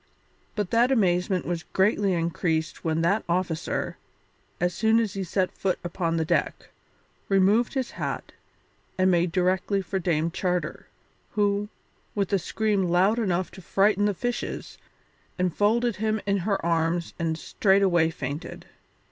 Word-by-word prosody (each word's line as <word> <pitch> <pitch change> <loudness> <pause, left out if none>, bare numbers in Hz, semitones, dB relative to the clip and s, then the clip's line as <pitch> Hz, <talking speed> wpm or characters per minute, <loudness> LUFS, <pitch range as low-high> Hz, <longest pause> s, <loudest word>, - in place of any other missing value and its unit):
But 205 -4 -2
that 240 +3 +4
amazement 185 -5 +2
was 170 -1 -2
greatly 195 +1 +1
increased 165 -1 -1
when 160 0 0
that 195 +6 +2
officer, 170 -2 -1 0.6
as 175 0 +1
soon 220 +4 +3
as 220 -4 -1
he 195 - -3
set 185 +1 0
foot 190 -2 0
upon 170 -1 -1
the 160 - 0
deck, - - -1 0.6
removed 200 +6 +3
his 260 -2 -1
hat - - -4 0.7
and 185 0 +4
made 175 -1 +2
directly 185 +2 +1
for 190 0 -3
Dame 165 -2 0
Charter, 180 0 -2 0.5
who, 205 0 +1 0.5
with 200 -1 -1
a 195 - +4
scream 205 +1 0
loud 185 +6 +3
enough 185 -4 0
to 190 - -11
frighten 200 +3 +2
the 205 -1 +1
fishes, 245 +5 -4 0.6
enfolded 205 +5 +1
him 215 +1 0
in 200 0 +2
her 200 +2 0
arms 165 0 0
and 160 -1 -1
straightway 190 -4 +3
fainted. 145 -1 -6
185 Hz, 140 wpm, -26 LUFS, 170-205 Hz, 0.7 s, that